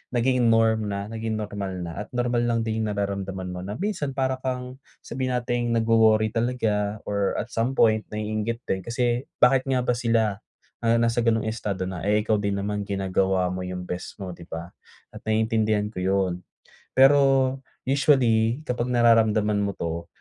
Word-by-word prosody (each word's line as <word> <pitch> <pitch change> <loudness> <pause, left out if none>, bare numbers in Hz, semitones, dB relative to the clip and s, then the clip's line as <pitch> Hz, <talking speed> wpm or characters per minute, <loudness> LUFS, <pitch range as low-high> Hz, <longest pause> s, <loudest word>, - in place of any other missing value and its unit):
nagiging 125 0 +2
norm 110 -1 +3
na 100 +1 -4
naging 110 0 -3
normal 105 -3 -4
na 85 - -5
at - - -23
normal 120 -1 +1
lang 115 -1 +1
din 110 0 -2
yung 105 - -2
nararamdaman 95 -2 -3
mo 90 - -6
na 105 - -5
minsan 175 -8 -2
para 130 -1 0
kang 125 0 -4 0.3
sabihin 130 -1 -3
nating 120 -1 -1
nag-worry 110 -1 +4
talaga, 110 -3 -1
or 100 -1 -1
at 115 - -4
some 120 +4 -1
point 110 -3 +3
naiinggit 110 +2 -3
din 95 - -1
kasi 120 +4 -1
bakit 130 +1 +5
nga 130 -2 +1
ba 125 - +1
sila 115 -4 +1 0.4
na 115 0 +3
nasa 115 0 +1
gano'ng 115 -1 +1
estado 100 -4 -3
na, 90 -3 -5
eh, 105 +1 +2
ikaw 110 - +3
din 100 -1 -1
naman 105 0 -2
ginagawa 95 -1 0
mo 90 0 -4
yung 90 0 -5
best 90 +3 -6
mo, 95 -3 -6
di 85 - -12
ba? 85 0 -7 0.5
At - - -10
naiintindihan 110 -1 +1
ko 105 - -12
yun. 95 -1 +1 0.6
Pero 135 -1 +5 0.2
usually, 130 -2 +2
kapag 125 -3 -2
nararamdaman 110 -3 +3
mo 100 -1 -2
'to, 85 0 -4
110 Hz, 170 wpm, -25 LUFS, 100-120 Hz, 0.6 s, bakit